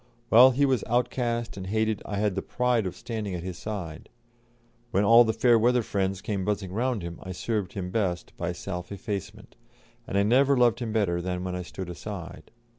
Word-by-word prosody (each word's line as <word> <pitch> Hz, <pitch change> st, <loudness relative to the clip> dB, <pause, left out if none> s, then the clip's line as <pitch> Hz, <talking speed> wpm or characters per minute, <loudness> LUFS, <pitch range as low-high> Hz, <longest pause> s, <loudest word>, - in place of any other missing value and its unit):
While 125 Hz, +4 st, +9 dB
he 135 Hz, +2 st, +2 dB
was 130 Hz, -5 st, +1 dB
outcast 120 Hz, -1 st, -1 dB
and 95 Hz, -1 st, -6 dB
hated 110 Hz, +1 st, 0 dB
I 100 Hz, -, -4 dB
had 105 Hz, -1 st, +1 dB
the 95 Hz, -, -2 dB
pride 125 Hz, -3 st, 0 dB
of 90 Hz, -, -6 dB
standing 110 Hz, -5 st, -4 dB
at 85 Hz, -, -5 dB
his 90 Hz, -1 st, -6 dB
side; 90 Hz, -8 st, -6 dB, 0.8 s
when 100 Hz, -2 st, +2 dB
all 115 Hz, +3 st, +8 dB
the 110 Hz, -, +1 dB
fair 120 Hz, 0 st, +4 dB
weather 120 Hz, +1 st, +3 dB
friends 95 Hz, -2 st, -1 dB
came 100 Hz, -3 st, -2 dB
buzzing 100 Hz, -2 st, -2 dB
round 120 Hz, -2 st, -1 dB
him 85 Hz, -1 st, -6 dB
I 95 Hz, -, -6 dB
served 105 Hz, 0 st, -2 dB
him 90 Hz, -2 st, -4 dB
best 95 Hz, -5 st, -2 dB
by 85 Hz, +1 st, -2 dB
self 90 Hz, 0 st, -6 dB
effacement, 100 Hz, -1 st, -6 dB, 0.5 s
and 100 Hz, -, -1 dB
I 100 Hz, -, +4 dB
never 135 Hz, +6 st, +4 dB
loved 120 Hz, -1 st, +4 dB
him 120 Hz, -3 st, -3 dB
better 95 Hz, -6 st, +1 dB
than 90 Hz, 0 st, -3 dB
when 90 Hz, -1 st, -3 dB
I 90 Hz, -, -3 dB
stood 90 Hz, +1 st, -7 dB
aside. 85 Hz, -1 st, -8 dB
105 Hz, 200 wpm, -27 LUFS, 95-115 Hz, 0.8 s, While